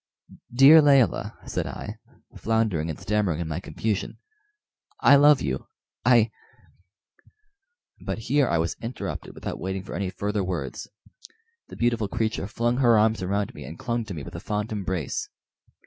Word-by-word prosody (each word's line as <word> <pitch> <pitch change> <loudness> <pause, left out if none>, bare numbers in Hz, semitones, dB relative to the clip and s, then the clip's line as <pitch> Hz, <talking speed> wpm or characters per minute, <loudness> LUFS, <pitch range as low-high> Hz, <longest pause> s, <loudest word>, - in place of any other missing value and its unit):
"Dear 135 +6 +8
Layelah," 140 - +3
said - - -3
I, - - -7 0.4
floundering 110 -8 0
and 80 - -5
stammering 100 -6 0
in 85 - -3
my 80 +2 -3
confusion, 105 +1 -3 0.8
"I 140 - +7
love 145 0 +6
you; 65 -2 -3 0.4
I 120 -2 +4 0.9
" 425 +2 -35
But - - -2
here 130 +4 +1
I 85 - +2
was 80 0 -1
interrupted 115 +2 -6
without - - -6
waiting 95 +1 -4
for - - -9
any 95 -2 -2
further 100 +2 -2
words; 85 -9 -4 0.8
the - - -11
beautiful 115 -3 0
creature 110 -2 -2
flung 120 +3 -1
her 120 -4 +5
arms 110 -1 +2
around 100 +2 -1
me - - -9
and 80 - -9
clung 120 -1 -2
to 95 - -7
me 75 - -6
with 85 - -9
a 85 - -6
fond 105 +4 -3
embrace. 95 -8 -3
105 Hz, 160 wpm, -25 LUFS, 95-120 Hz, 0.9 s, Dear